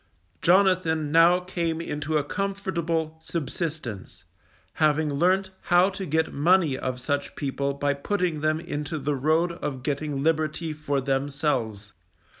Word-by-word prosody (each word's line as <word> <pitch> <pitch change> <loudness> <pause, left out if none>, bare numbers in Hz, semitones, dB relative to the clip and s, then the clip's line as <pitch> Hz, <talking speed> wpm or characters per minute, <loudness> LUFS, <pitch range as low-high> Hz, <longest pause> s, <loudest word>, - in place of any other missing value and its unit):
Jonathan 175 -5 +3
now 170 +2 +6
came 170 -3 -2
into 150 -1 -2
a 145 - +1
comfortable 170 -3 -2
subsistence, 155 - -5 0.5
having 155 -1 +2
learnt 185 +5 +2
how 180 +2 +4
to 195 -1 -5
get 160 +2 0
money 165 -1 +3
of 130 -1 -3
such 140 +2 -2
people 140 0 -2
by 145 0 +1
putting 175 +1 -1
them 155 0 +1
into 155 -2 -4
the 145 0 -1
road 160 +5 +2
of 145 -6 -5
getting 145 -1 -2
liberty 155 0 0
for 145 -2 -1
themselves. 135 -6 -1
155 Hz, 130 wpm, -26 LUFS, 140-170 Hz, 0.5 s, now